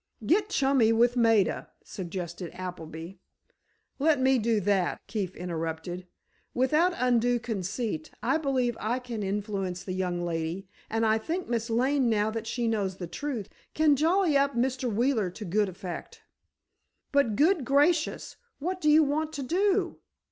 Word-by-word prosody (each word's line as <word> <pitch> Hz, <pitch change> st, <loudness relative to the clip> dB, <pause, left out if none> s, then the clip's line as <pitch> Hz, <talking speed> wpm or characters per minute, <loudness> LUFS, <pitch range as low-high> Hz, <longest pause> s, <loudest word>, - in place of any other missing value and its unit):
"Get 410 Hz, +4 st, +2 dB
chummy 270 Hz, -, +3 dB
with 235 Hz, +2 st, +3 dB
Maida," 225 Hz, -5 st, +2 dB
suggested 175 Hz, -1 st, -6 dB
Appleby. 165 Hz, -2 st, -7 dB, 0.9 s
"Let 300 Hz, 0 st, +3 dB
me 260 Hz, 0 st, +3 dB
do 225 Hz, -1 st, +1 dB
that," 195 Hz, -2 st, +1 dB
Keefe 195 Hz, -5 st, -3 dB
interrupted. 170 Hz, +1 st, -4 dB, 0.5 s
"Without 305 Hz, +8 st, +3 dB
undue 245 Hz, -1 st, +2 dB
conceit, 225 Hz, -, -3 dB
I 320 Hz, -, +2 dB
believe 260 Hz, -5 st, 0 dB
I 225 Hz, +4 st, -1 dB
can 245 Hz, -4 st, -5 dB
influence 195 Hz, -2 st, -3 dB
the 185 Hz, -, -4 dB
young 180 Hz, -2 st, -2 dB
lady, 170 Hz, +3 st, -3 dB, 0.2 s
and 225 Hz, +1 st, +1 dB
I 220 Hz, 0 st, +3 dB
think 340 Hz, +11 st, -3 dB
Miss 230 Hz, -1 st, -1 dB
Lane, 255 Hz, +2 st, +2 dB
now 215 Hz, -1 st, +1 dB
that 225 Hz, 0 st, -5 dB
she 235 Hz, 0 st, -1 dB
knows 200 Hz, -4 st, -1 dB
the 180 Hz, -, -5 dB
truth, 230 Hz, -, -4 dB, 0.3 s
can 310 Hz, -2 st, +4 dB
jolly 330 Hz, +2 st, +2 dB
up 280 Hz, -1 st, +2 dB
Mr. 255 Hz, 0 st, 0 dB
Wheeler 225 Hz, -2 st, +1 dB
to 210 Hz, +4 st, -8 dB
good 200 Hz, +3 st, +1 dB
effect." 180 Hz, -1 st, -8 dB, 0.9 s
"But, 280 Hz, -7 st, +2 dB
good 320 Hz, -, +3 dB
gracious! 295 Hz, +5 st, +1 dB, 0.2 s
What 365 Hz, +5 st, -3 dB
do 300 Hz, -, +3 dB
you 310 Hz, +1 st, +7 dB
want 305 Hz, +2 st, -1 dB
to 285 Hz, -3 st, -4 dB
do?" 375 Hz, +8 st, +1 dB
230 Hz, 150 wpm, -28 LUFS, 190-280 Hz, 0.9 s, you